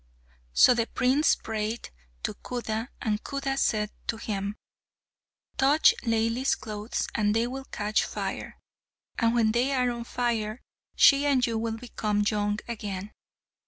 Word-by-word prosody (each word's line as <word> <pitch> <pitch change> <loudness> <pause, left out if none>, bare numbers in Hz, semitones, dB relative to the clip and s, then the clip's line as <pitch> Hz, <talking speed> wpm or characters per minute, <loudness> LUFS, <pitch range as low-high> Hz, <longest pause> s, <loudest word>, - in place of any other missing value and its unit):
So 250 - +7
the 235 -1 0
prince 260 +4 +3
prayed 220 +1 -4 0.3
to - - -1
Khuda, 230 -2 -4 0.2
and 215 -2 -1
Khuda 275 -1 -2
said 215 -5 +1 0.2
to 225 - -1
him, 200 -2 -3 1.0
"Touch 280 +4 +5
Laili's 230 +2 +1
clothes 215 0 -4
and 210 -1 +1
they 225 +1 +2
will 265 +2 -5
catch 210 -2 0
fire, - - -5 0.6
and 230 0 +3
when 225 -2 +3
they 250 +4 +1
are 250 -2 +2
on 235 -1 -5
fire, 235 -2 -1 0.4
she 280 +1 +6
and 260 -3 +3
you 230 -1 -1
will 225 0 -2
become 215 -3 -1
young 210 -1 0
again." 210 -3 -5
230 Hz, 140 wpm, -27 LUFS, 215-250 Hz, 1.0 s, So